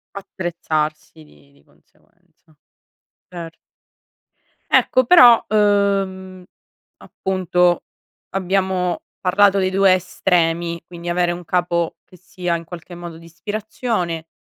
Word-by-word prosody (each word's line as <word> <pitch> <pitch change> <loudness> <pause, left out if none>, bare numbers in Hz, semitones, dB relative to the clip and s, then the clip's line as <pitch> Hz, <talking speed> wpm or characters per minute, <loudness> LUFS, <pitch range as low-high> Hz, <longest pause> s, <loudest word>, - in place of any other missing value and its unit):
Attrezzarsi 160 - -4
di 75 -1 -22
di 70 0 -27
conseguenza, 155 - -32 0.7
cert 165 -2 -9 1.1
Ecco 255 - +3
però, 240 -6 +7
uhm, 195 -3 0 0.5
appunto 180 -2 0 0.5
abbiamo 190 -1 -1 0.2
parlato 195 +2 +3
dei 185 -1 +1
2 195 0 +4
estremi, 170 -2 -1
quindi 175 0 -8
avere 175 0 +1
un 175 0 -7
capo 175 -1 -1
che 180 - -18
sia 180 -1 -4
in 165 - -5
qualche 175 +1 -10
modo 170 -1 -9
di 165 - -15
ispirazione, 190 -2 -4
180 Hz, 105 wpm, -20 LUFS, 170-195 Hz, 1.1 s, però